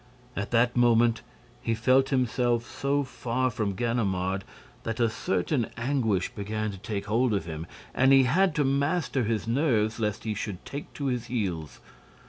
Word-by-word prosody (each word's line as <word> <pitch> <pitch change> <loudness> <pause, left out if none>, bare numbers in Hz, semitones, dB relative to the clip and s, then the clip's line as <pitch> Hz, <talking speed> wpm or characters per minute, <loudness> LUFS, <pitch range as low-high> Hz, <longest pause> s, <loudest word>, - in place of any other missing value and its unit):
At 105 - -3
that 120 +1 +3
moment, 120 -1 +4 0.4
he 115 - 0
felt 130 +4 +3
himself 120 -2 +1
so 140 +2 -1
far 130 -1 -1
from 105 -3 -2
Ganimard 95 -4 0 0.4
that 115 0 -4
a 115 -2 +3
certain 145 -5 0
anguish 115 -7 0
began 110 +1 -3
to 95 - -9
take 100 -1 -4
hold 115 +2 +2
of 100 - -2
him 80 0 -6 0.3
and 130 +1 +4
he 135 -1 +7
had 170 +6 +3
to 150 - +2
master 140 -1 +1
his 110 0 -1
nerves 115 -4 +1
lest 105 -2 -1
he 110 - -1
should 105 -3 -5
take 140 +1 -7
to 145 - -4
his 125 -3 -1
heels. 95 - -3
115 Hz, 165 wpm, -27 LUFS, 105-130 Hz, 0.4 s, he